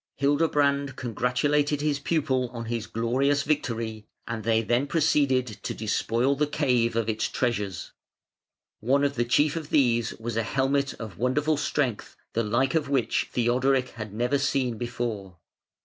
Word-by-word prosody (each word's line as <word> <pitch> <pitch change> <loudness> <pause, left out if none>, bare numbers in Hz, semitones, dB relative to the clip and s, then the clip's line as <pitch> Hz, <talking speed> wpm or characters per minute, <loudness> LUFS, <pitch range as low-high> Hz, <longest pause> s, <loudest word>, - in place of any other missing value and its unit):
Hildebrand 140 -1 +1
congratulated 130 +5 0
his 150 -1 0
pupil 140 -5 0
on 115 -1 -5
his 115 -1 -3
glorious 135 +5 +1
victory, 115 -7 -2 0.2
and 115 -2 -4
they 115 0 +2
then 120 +5 +1
proceeded 140 -4 +2 0.2
to - - -4
despoil 115 +4 0
the 150 +1 +1
cave 125 -6 +1
of 115 -1 0
its 110 -1 0
treasures. 105 -8 -2 0.9
One 135 +5 +2
of 140 0 +1
the 120 -2 0
chief 145 +5 +2
of 155 -2 -5
these 120 -6 +2
was 115 0 -5
a - - +3
helmet 135 +4 0
of 110 -7 -9
wonderful 145 +6 +1
strength, 140 -5 -2 0.2
the 115 - +1
like 120 +5 +1
of 155 -4 0
which 130 -5 0
Theodoric 125 +2 +1
had 110 -2 -8
never 120 +6 0
seen 130 -4 0
before. 110 -6 -4
125 Hz, 150 wpm, -26 LUFS, 115-140 Hz, 0.9 s, a